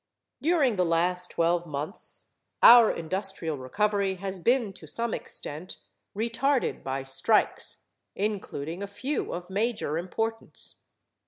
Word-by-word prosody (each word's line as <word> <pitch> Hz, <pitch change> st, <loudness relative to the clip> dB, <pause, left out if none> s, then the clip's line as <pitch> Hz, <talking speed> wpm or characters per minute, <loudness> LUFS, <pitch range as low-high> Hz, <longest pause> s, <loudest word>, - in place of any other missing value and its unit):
During 295 Hz, -, +3 dB
the 180 Hz, -, +3 dB
last 180 Hz, +2 st, +2 dB
twelve 170 Hz, +1 st, +1 dB
months 150 Hz, +6 st, -2 dB, 0.3 s
our 235 Hz, -2 st, +10 dB
industrial 170 Hz, -3 st, -3 dB
recovery 200 Hz, +8 st, 0 dB
has 190 Hz, 0 st, -5 dB
been 235 Hz, +1 st, +2 dB
to 175 Hz, -4 st, -12 dB
some 230 Hz, +8 st, -2 dB
extent 155 Hz, +5 st, -5 dB, 0.4 s
retarded 235 Hz, +5 st, 0 dB
by 135 Hz, 0 st, -3 dB
strikes, 135 Hz, +11 st, +1 dB, 0.3 s
including 190 Hz, -5 st, -3 dB
a 200 Hz, -, -3 dB
few 260 Hz, +9 st, -3 dB
of 180 Hz, +2 st, -6 dB
major 205 Hz, -6 st, -1 dB
importance. 225 Hz, +5 st, -4 dB
190 Hz, 115 wpm, -27 LUFS, 165-225 Hz, 0.4 s, our